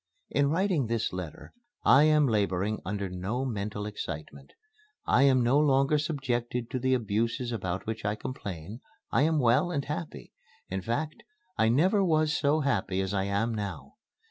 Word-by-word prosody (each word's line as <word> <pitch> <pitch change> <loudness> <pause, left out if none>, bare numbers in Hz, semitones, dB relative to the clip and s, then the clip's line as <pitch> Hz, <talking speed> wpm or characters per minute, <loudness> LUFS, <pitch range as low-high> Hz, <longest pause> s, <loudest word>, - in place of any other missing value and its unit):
In 140 0 +2
writing 170 - +1
this 115 -3 -1
letter 90 -4 -7 0.3
I 140 +3 +6
am 155 -1 +4
laboring 105 -2 0
under 100 +1 -3
no 95 +8 -3
mental 105 -3 -3
excitement. 75 -8 -7 0.5
I 125 - +3
am 130 -2 +5
no 125 +5 +4
longer 140 0 +3
subjected 125 -5 -2
to 130 - -1
the 130 +1 +2
abuses 115 +2 -1
about 95 -5 -3
which 110 0 -4
I 105 0 0
complain. 105 - -7 0.3
I - - +3
am 160 +1 +3
well 130 +5 +3
and 145 -5 -2
happy. 150 - -6 0.4
In 95 0 -2
fact 145 - -3 0.3
I 110 0 +3
never 185 - +3
was 155 -3 +2
so 150 +2 +2
happy 100 -9 0
as 95 0 -1
I 95 -1 0
am 100 +4 0
now. 100 -7 -6
120 Hz, 165 wpm, -28 LUFS, 100-140 Hz, 0.5 s, I